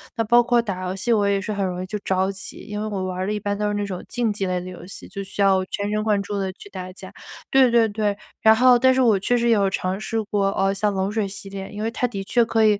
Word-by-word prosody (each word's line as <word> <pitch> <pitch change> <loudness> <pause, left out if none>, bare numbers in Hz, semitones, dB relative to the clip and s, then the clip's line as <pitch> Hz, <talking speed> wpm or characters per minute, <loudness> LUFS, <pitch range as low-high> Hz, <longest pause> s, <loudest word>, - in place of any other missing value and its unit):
那 230 - 0
包 240 +2 +5
括 240 0 +2
打 195 -5 -3
游 185 +1 -3
戏， 215 +5 0
我 205 -2 +2
也 200 0 +2
是 210 +2 -4
很 200 -1 -1
容 180 -1 -2
易 - - -5
就 210 +2 -4
着 190 0 0
急， 190 -1 -8
因 210 0 -4
为 215 - -2
我 195 -3 -3
玩 185 0 -4
儿 185 - -1
的 210 - -1
一 210 - -2
般 205 0 -2
都 210 0 -1
是 205 - -1
那 205 0 -1
种 185 -3 -6
竞 235 -3 0
技 195 -2 -2
类 180 0 0
的 180 - -8
游 180 - -10
戏， - - -10
就 195 0 -6
需 200 +1 -2
要 190 -1 +4
全 205 +2 -3
神 215 0 0
贯 210 -2 +2
注 205 0 -3
地 190 -1 -2
去 200 - -13
打 185 -2 -7
架。 190 0 -11 0.4
对 265 -1 +6
对 235 -1 +4
对， 205 -1 -1 0.2
然 220 0 +6
后 250 +1 +6
但 260 +1 +5
是 260 - 0
我 225 -6 +4
确 245 +5 +1
实 235 0 +1
有 200 -4 +3
尝 185 +1 -2
试 225 +1 -2
过， 205 -1 0
哦 195 0 +2
像 205 +1 0
冷 190 +1 -1
水 215 -2 -1
洗 195 0 -8
脸， 195 -1 -7
因 210 0 -5
为 225 - -1
它 250 +2 0
的 200 -5 -5
确 235 +4 +2
可 225 -1 +2
以 210 -1 +4
205 Hz, 335 characters per minute, -23 LUFS, 195-220 Hz, 0.4 s, 对